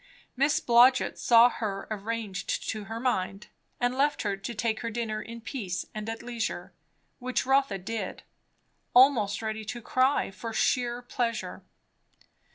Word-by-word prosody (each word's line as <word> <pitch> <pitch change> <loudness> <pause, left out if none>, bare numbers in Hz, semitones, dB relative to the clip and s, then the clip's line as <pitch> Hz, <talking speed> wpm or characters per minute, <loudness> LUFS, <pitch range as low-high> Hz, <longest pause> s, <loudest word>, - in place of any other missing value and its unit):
Miss 285 +4 +2
Blodgett 250 -1 +4
saw 235 0 +7
her 205 -5 -4
arranged 215 -2 -3
to 215 -2 -3
her 225 +3 -5
mind, 200 -5 -2 0.3
and 245 0 +1
left 285 +2 +1
her 205 -2 0
to 195 +4 -6
take 220 +1 -1
her 230 - -3
dinner 220 -2 -3
in 230 +2 -9
peace 220 -6 -4
and 215 +1 -5
at 225 +1 -5
leisure; 235 -2 -4 0.5
which 255 0 -1
Rotha 265 -6 +2
did, 200 +1 -5 0.7
almost 240 -6 +5
ready 220 0 -3
to 240 +3 -5
cry 255 +1 +1
for 225 +4 -7
sheer 240 +2 +1
pleasure. 240 -2 -3
230 Hz, 145 wpm, -28 LUFS, 215-245 Hz, 0.7 s, saw